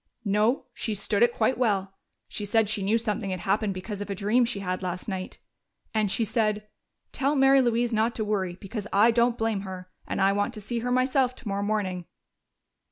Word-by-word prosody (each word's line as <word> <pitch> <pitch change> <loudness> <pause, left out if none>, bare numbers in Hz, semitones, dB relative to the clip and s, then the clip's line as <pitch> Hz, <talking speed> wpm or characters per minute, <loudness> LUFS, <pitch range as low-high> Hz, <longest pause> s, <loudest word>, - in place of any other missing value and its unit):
"No, 210 +6 +2
she 220 -3 -3
stood 200 +1 -1
it 240 0 +6
quite 235 +2 0
well. 195 -5 +1 0.3
She 210 - -5
said 215 +1 +2
she 210 -1 -2
knew 205 +4 +2
something 215 -2 -2
had 185 -1 -3
happened 200 0 0
because 200 +2 -5
of 205 - -5
a 200 - -2
dream 215 +5 +2
she 230 -4 -3
had 185 -1 -2
last 180 -1 -4
night. 190 -3 -5 0.6
And 215 -2 +1
she 225 - +2
said, 215 -1 0 0.4
'Tell 280 +2 0
Mary 270 0 +6
Louise 240 -1 +1
not 225 +2 +1
to 220 - -1
worry, 190 -4 -1
because 210 +1 -6
I 210 +4 +5
don't 235 +1 +2
blame 225 -3 0
her. 185 -1 -8 0.2
And - - -3
I 195 0 +4
want 205 +4 -1
to - - -6
see 235 +3 -2
her 245 +2 -3
myself 255 0 +2
tomorrow 200 -5 -3
morning.'" 200 -4 -1
210 Hz, 205 wpm, -26 LUFS, 195-235 Hz, 0.6 s, it